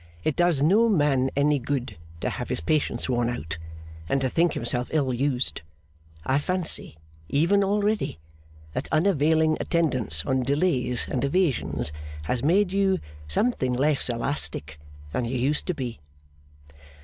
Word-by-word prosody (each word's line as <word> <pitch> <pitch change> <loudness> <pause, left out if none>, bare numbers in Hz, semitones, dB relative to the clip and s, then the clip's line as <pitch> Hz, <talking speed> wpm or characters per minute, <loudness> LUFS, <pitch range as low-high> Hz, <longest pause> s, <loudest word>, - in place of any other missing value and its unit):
It 155 - 0
does 175 -5 +2
no 215 +9 +4
man 145 -8 +2
any 145 +1 +2
good 130 0 -3 0.3
to - - -1
have - - -5
his - - 0
patience 120 - -1
worn 120 -2 0
out, 80 -9 -4 0.5
and 135 - +2
to 130 - +1
think 165 +4 +2
himself 120 +1 0
ill 140 -5 +1
used. 130 0 0 0.6
I 135 +2 +2
fancy, 180 - 0 0.3
even 170 +8 +3
already, 205 - 0 0.6
that - - -3
unavailing 160 -2 +3
attendance 130 - 0
on 130 0 +1
delays 130 -3 0
and 130 - -2
evasions 140 - 0 0.3
has 120 +10 -2
made 185 +6 +2
you 195 -1 +2 0.3
something 130 - +1
less 140 +2 +3
elastic 115 - +1 0.3
than 120 - -1
you 125 +2 -2
used 140 +5 0
to 180 - -1
be. 125 -6 -5
140 Hz, 140 wpm, -25 LUFS, 125-170 Hz, 0.6 s, no